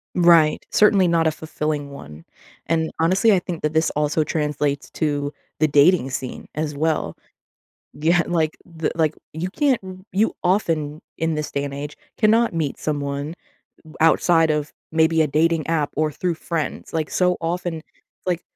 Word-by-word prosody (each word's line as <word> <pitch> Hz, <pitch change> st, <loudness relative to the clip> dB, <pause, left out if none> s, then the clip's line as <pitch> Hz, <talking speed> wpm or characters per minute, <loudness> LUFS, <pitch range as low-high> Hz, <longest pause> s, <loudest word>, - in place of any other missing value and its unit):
Right, 170 Hz, -3 st, +5 dB
certainly 200 Hz, -3 st, +4 dB
not 165 Hz, -1 st, +2 dB
a 160 Hz, -, +3 dB
fulfilling 150 Hz, -2 st, -3 dB
one. 75 Hz, -, -11 dB, 0.4 s
And, 160 Hz, 0 st, 0 dB
honestly, 190 Hz, +6 st, +4 dB
I 185 Hz, -, +4 dB
think 175 Hz, -2 st, -6 dB
that 150 Hz, +1 st, 0 dB
this 160 Hz, +1 st, +2 dB
also 150 Hz, +1 st, +1 dB
translates 150 Hz, -2 st, -2 dB
to 145 Hz, -2 st, -1 dB, 0.3 s
the 155 Hz, -, +4 dB
dating 145 Hz, -1 st, +4 dB
scene 130 Hz, -1 st, -5 dB
as 150 Hz, -1 st, -3 dB
well. 155 Hz, +2 st, -1 dB, 0.8 s
Yeah. 165 Hz, +4 st, +2 dB
Like, 160 Hz, -3 st, 0 dB
the 165 Hz, -2 st, -3 dB
like, 160 Hz, -2 st, +1 dB, 0.2 s
you 175 Hz, +4 st, -3 dB
can't 275 Hz, +2 st, +1 dB, 0.3 s
you, 210 Hz, +4 st, +1 dB
often 160 Hz, -5 st, 0 dB, 0.2 s
in 165 Hz, -1 st, 0 dB
this 150 Hz, 0 st, -3 dB
day 140 Hz, -, -1 dB
and 140 Hz, -1 st, -5 dB
age, 145 Hz, +1 st, -6 dB, 0.2 s
cannot 225 Hz, 0 st, +3 dB
meet 160 Hz, -4 st, -2 dB
someone 145 Hz, 0 st, -3 dB, 0.5 s
m 155 Hz, -, -15 dB
outside 165 Hz, 0 st, +4 dB
of 150 Hz, -1 st, -1 dB, 0.2 s
maybe 160 Hz, 0 st, +3 dB
a -, -, +2 dB
dating 160 Hz, +1 st, +1 dB
app 155 Hz, -3 st, +1 dB
or 155 Hz, 0 st, +1 dB
through 175 Hz, +3 st, -2 dB
friends, 160 Hz, -1 st, -4 dB
like, 160 Hz, -2 st, -2 dB
so 180 Hz, -1 st, +2 dB
often 170 Hz, 0 st, -2 dB, 0.4 s
like, 180 Hz, -2 st, -1 dB
160 Hz, 160 wpm, -22 LUFS, 150-170 Hz, 0.8 s, Right